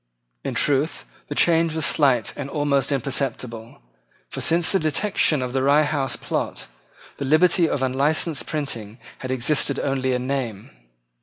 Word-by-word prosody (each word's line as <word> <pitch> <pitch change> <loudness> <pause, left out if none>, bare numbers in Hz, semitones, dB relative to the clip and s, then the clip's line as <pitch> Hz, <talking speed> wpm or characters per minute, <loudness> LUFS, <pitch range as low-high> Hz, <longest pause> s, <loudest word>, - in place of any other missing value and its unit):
In - - -4
truth, 145 +3 0 0.2
the - - -5
change 165 -1 +3
was 160 - 0
slight 130 -7 +2
and 140 -1 -6
almost 140 -2 0
imperceptible; 125 - -3 0.5
for, - - -6
since 165 -2 +2
the 195 - +2
detection 155 -2 +1
of 125 0 -5
the 135 - 0
Rye 145 +3 +4
House 145 -4 -1
plot, - - -4 0.5
the 140 - -4
liberty 165 +3 +3
of 135 - -1
unlicensed 140 +4 +1
printing 120 -8 -4 0.2
had 130 - -6
existed 130 +3 +1
only 130 -2 -1
in 125 0 -2
name. 125 -7 -4
140 Hz, 150 wpm, -22 LUFS, 130-155 Hz, 0.5 s, Rye